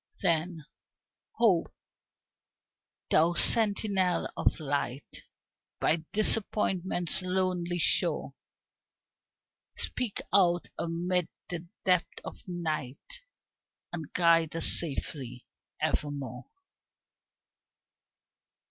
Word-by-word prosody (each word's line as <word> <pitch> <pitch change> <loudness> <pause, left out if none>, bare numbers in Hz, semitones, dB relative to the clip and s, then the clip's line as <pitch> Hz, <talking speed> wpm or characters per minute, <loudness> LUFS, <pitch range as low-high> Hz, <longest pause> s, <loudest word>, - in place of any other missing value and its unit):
Then, 165 0 +1 0.7
Hope, 200 -8 +3 1.4
thou 165 +2 +4
sentinel 200 -3 +2
of - - +1
light 140 -2 -4 0.5
By 160 - +3
Disappointment's 190 -5 +1
lonely 180 -1 -1
shore, 170 - +1 1.4
Speak 245 -5 -3
out 175 -3 +3
amid 175 +1 0 0.2
the 170 -1 -5 0.2
depth 180 -2 +1
of - - -8
night 170 - -4 0.7
And 160 -4 -5
guide 165 -2 +3
us 165 - +1
safely 135 -5 0 0.3
evermore. 140 -3 -2
175 Hz, 70 wpm, -29 LUFS, 155-185 Hz, 1.4 s, thou